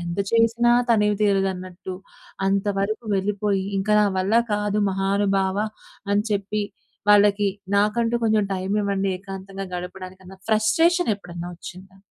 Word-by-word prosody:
ఎంత 170 Hz, 0 st, -4 dB, 0.2 s
చేసినా 230 Hz, +1 st, +3 dB, 0.2 s
తనివి 210 Hz, -2 st, +3 dB
తీరదన్నట్టు, 190 Hz, -2 st, -1 dB, 0.5 s
అంతవరకు 200 Hz, +3 st, 0 dB
వెళ్ళిపోయి, 200 Hz, 0 st, -1 dB
ఇంక 195 Hz, -, -3 dB
నా 210 Hz, -, +4 dB
వల్ల 195 Hz, +4 st, 0 dB, 0.2 s
కాదు 210 Hz, 0 st, 0 dB
మహానుభావ 195 Hz, 0 st, 0 dB, 0.6 s
అని 205 Hz, +1 st, +2 dB
చెప్పి 205 Hz, +1 st, -1 dB, 0.5 s
వాళ్ళకి, 205 Hz, 0 st, +5 dB, 0.3 s
నాకంటూ 230 Hz, +3 st, +2 dB
కొంచెం 215 Hz, -2 st, +3 dB
టైమివ్వండి 195 Hz, +1 st, -1 dB
ఏకాంతంగా 195 Hz, 0 st, -7 dB
గడపడానికన్నా, 185 Hz, +1 st, -8 dB
ఫ్రస్ట్రేషనెప్పుడన్నా 215 Hz, -, +1 dB
ఒచ్చిందా? 185 Hz, +2 st, -11 dB
200 Hz, 105 wpm, -23 LUFS, 190-210 Hz, 0.6 s, వాళ్ళకి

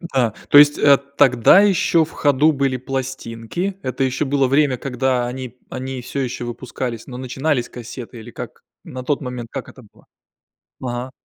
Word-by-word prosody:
Да, 130 Hz, -, 0 dB, 0.2 s
то 145 Hz, -, +7 dB
есть, 145 Hz, 0 st, +6 dB
э, 140 Hz, -1 st, +6 dB, 0.2 s
тогда 130 Hz, -, +6 dB
ещё 180 Hz, -4 st, +3 dB
в 160 Hz, -, -15 dB
ходу 145 Hz, +2 st, +3 dB
были 135 Hz, -2 st, 0 dB
пластинки, 135 Hz, -, -4 dB
это 130 Hz, -1 st, -2 dB
ещё 130 Hz, +3 st, 0 dB
было 140 Hz, -1 st, +2 dB
время, 140 Hz, -1 st, +2 dB
когда 130 Hz, -1 st, -1 dB
они 125 Hz, 0 st, -6 dB
они 130 Hz, 0 st, -5 dB
всё 140 Hz, -, -5 dB
ещё 120 Hz, -1 st, -4 dB
выпускались, 120 Hz, -1 st, -5 dB
но 125 Hz, -1 st, -8 dB
начинались 130 Hz, 0 st, -1 dB
кассеты 120 Hz, 0 st, -9 dB
или 115 Hz, +2 st, -11 dB
как? -, -, -9 dB, 0.2 s
На 130 Hz, 0 st, -8 dB
тот 145 Hz, +2 st, -1 dB
момент 125 Hz, -3 st, -5 dB
как 135 Hz, -, -6 dB
это 130 Hz, -, -14 dB
было? -, -, -24 dB, 0.8 s
Ага. 125 Hz, +1 st, -4 dB
130 Hz, 170 wpm, -20 LUFS, 125-140 Hz, 0.8 s, то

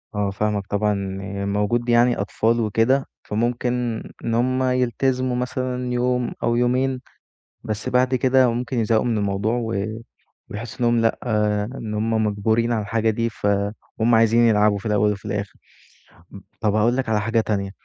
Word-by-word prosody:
آه 105 Hz, -1 st, 0 dB
فاهمك 100 Hz, 0 st, -2 dB
طبعًا، 105 Hz, 0 st, +1 dB
إن 100 Hz, 0 st, -4 dB
موجود 120 Hz, +4 st, 0 dB
يعني 120 Hz, +1 st, +4 dB
أطفال 115 Hz, +3 st, 0 dB
وكده 115 Hz, +5 st, +2 dB, 0.2 s
فممكن 120 Hz, +1 st, -1 dB, 0.2 s
إن 115 Hz, -, -1 dB
هُم 130 Hz, +2 st, +1 dB
يلتزموا 130 Hz, 0 st, 0 dB
مثلًا 125 Hz, 0 st, -2 dB
يوم 125 Hz, 0 st, 0 dB
أو 120 Hz, -, +2 dB
يومين، 125 Hz, +2 st, +1 dB, 0.6 s
بس 105 Hz, 0 st, -4 dB
بعد 125 Hz, +1 st, +2 dB
كده 130 Hz, 0 st, +4 dB
ممكن 120 Hz, +1 st, -3 dB
يزهقوا 110 Hz, 0 st, +2 dB
مِن 115 Hz, -3 st, 0 dB
الموضوع، 100 Hz, +3 st, 0 dB
و 100 Hz, -3 st, -2 dB, 0.7 s
ويحسوا 110 Hz, +3 st, -7 dB
إنهُم 120 Hz, 0 st, +3 dB
لأ 115 Hz, 0 st, +1 dB, 0.6 s
إن 110 Hz, -2 st, -5 dB
هُم 110 Hz, +1 st, 0 dB
مَجبورين 110 Hz, +3 st, +1 dB
على 110 Hz, -2 st, +1 dB
الحاجة 110 Hz, +2 st, 0 dB
دي 115 Hz, +2 st, 0 dB
فهُم 105 Hz, +3 st, -1 dB
عايزين 115 Hz, +1 st, +4 dB
يلعبوا 105 Hz, -3 st, +4 dB
في 100 Hz, -, -10 dB
الأول 105 Hz, -1 st, +2 dB
وفي 100 Hz, 0 st, -7 dB
الآخر. 100 Hz, -1 st, -3 dB, 0.8 s
ام 100 Hz, -, -10 dB, 0.2 s
طَب 105 Hz, -2 st, +1 dB
هاقول 115 Hz, +4 st, +2 dB
لك 130 Hz, -4 st, -2 dB
على 105 Hz, -1 st, +2 dB
حاجة 115 Hz, +2 st, +1 dB
تانية، 100 Hz, -3 st, -2 dB
115 Hz, 160 wpm, -22 LUFS, 105-125 Hz, 0.8 s, يعني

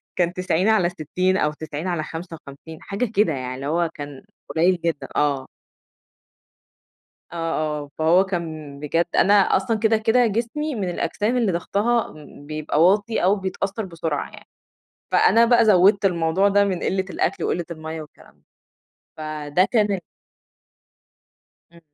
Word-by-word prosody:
كان 175 Hz, -1 st, +1 dB
90/60 185 Hz, -1 st, +1 dB
أو 150 Hz, -, +1 dB
90/55 160 Hz, -1 st, -6 dB
حاجة 200 Hz, +5 st, -2 dB
كده 200 Hz, -6 st, +3 dB
يعني، 130 Hz, -2 st, -4 dB
اللي 135 Hz, +2 st, -7 dB
هو 170 Hz, +2 st, +1 dB
كان 145 Hz, -2 st, -9 dB, 0.3 s
قليّل 175 Hz, +3 st, +2 dB
جدًا. 165 Hz, -3 st, -2 dB
آه. 140 Hz, -3 st, 0 dB, 1.9 s
آه، -, -, -8 dB
آه، 155 Hz, -3 st, -2 dB
فهو 165 Hz, +4 st, +4 dB
كان 160 Hz, -6 st, -5 dB
بجد 165 Hz, +3 st, 0 dB
أنا 200 Hz, -, +5 dB
أصلًا 205 Hz, +2 st, +2 dB
كده، 220 Hz, +1 st, +3 dB
كده، 225 Hz, +3 st, +3 dB
جسمي 235 Hz, +8 st, -2 dB
من 200 Hz, -5 st, -2 dB
الأجسام 205 Hz, +7 st, -1 dB
اللي 225 Hz, -6 st, +1 dB
ضغْطها 210 Hz, +7 st, 0 dB, 0.3 s
بيبقى 155 Hz, 0 st, -1 dB
واطي 205 Hz, +4 st, +2 dB
أو 195 Hz, +3 st, +4 dB
بيتأثّر 195 Hz, +2 st, -3 dB
بسرعة 160 Hz, -4 st, -4 dB
يعني، -, -, -15 dB, 0.6 s
فأنا 230 Hz, +4 st, +5 dB
بقى 235 Hz, -1 st, +4 dB
زوِّدت 200 Hz, 0 st, +5 dB
الموضوع 175 Hz, +1 st, +2 dB
ده 200 Hz, 0 st, +3 dB
من 190 Hz, -3 st, -1 dB
قِلّة 190 Hz, 0 st, 0 dB
الأكل 185 Hz, 0 st, -1 dB
وقِلّة 175 Hz, 0 st, -1 dB
المَيّة 160 Hz, 0 st, -6 dB
والكلام 150 Hz, -, -16 dB
ده. -, -, -36 dB, 0.7 s
فده 155 Hz, +2 st, 0 dB
كان 210 Hz, -4 st, +2 dB
ال 195 Hz, -, -2 dB, 1.7 s
إمم. 170 Hz, -, -17 dB
175 Hz, 135 wpm, -22 LUFS, 155-200 Hz, 1.9 s, أنا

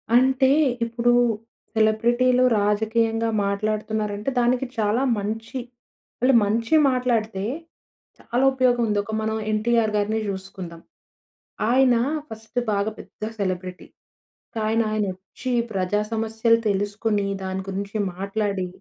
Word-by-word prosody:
అంటే, 265 Hz, +1 st, +4 dB, 0.4 s
ఇప్పుడు 235 Hz, +1 st, +1 dB, 0.6 s
సెలబ్రిటీలు 240 Hz, +4 st, +3 dB, 0.2 s
రాజకీయంగా 225 Hz, +2 st, +1 dB, 0.2 s
మాట్లాడుతున్నారంటే 210 Hz, +1 st, -2 dB
దానికి 245 Hz, +2 st, +2 dB
చాలా 220 Hz, +4 st, +1 dB, 0.2 s
మంచి 225 Hz, +5 st, -4 dB, 0.6 s
వాళ్ళు 255 Hz, +2 st, +4 dB
మంచి 230 Hz, +7 st, +1 dB
మాట్లాడితే 230 Hz, -6 st, 0 dB, 0.8 s
చాలా 245 Hz, +2 st, -1 dB
ఉపయోగం 250 Hz, -2 st, +2 dB
ఉంది. 210 Hz, -1 st, 0 dB
ఒక 220 Hz, -, -7 dB
మనం 220 Hz, 0 st, -1 dB, 0.2 s
'ఎన్టీఆర్' 220 Hz, 0 st, +1 dB
గారినే 210 Hz, +2 st, +1 dB
చూసుకుందాం. 190 Hz, -3 st, -7 dB, 0.9 s
ఆయన 255 Hz, -1 st, +5 dB, 0.3 s
ఫస్ట్ 220 Hz, +2 st, -5 dB
బాగా 205 Hz, +1 st, 0 dB
పెద్ద 215 Hz, -, -8 dB
సెలబ్రిటీ. 185 Hz, -2 st, -3 dB, 0.7 s
కానీ 220 Hz, +1 st, +1 dB
ఆయన 215 Hz, -1 st, 0 dB
వచ్చి 195 Hz, +7 st, -7 dB, 0.2 s
ప్రజా 195 Hz, +2 st, 0 dB
సమస్యలు 225 Hz, +1 st, +2 dB
తెలుసుకొని 205 Hz, +1 st, 0 dB, 0.2 s
దాని 190 Hz, 0 st, -3 dB
గురించి 200 Hz, +2 st, -4 dB, 0.2 s
మాట్లాడి, 200 Hz, 0 st, -2 dB
220 Hz, 105 wpm, -23 LUFS, 205-235 Hz, 0.9 s, ఆయన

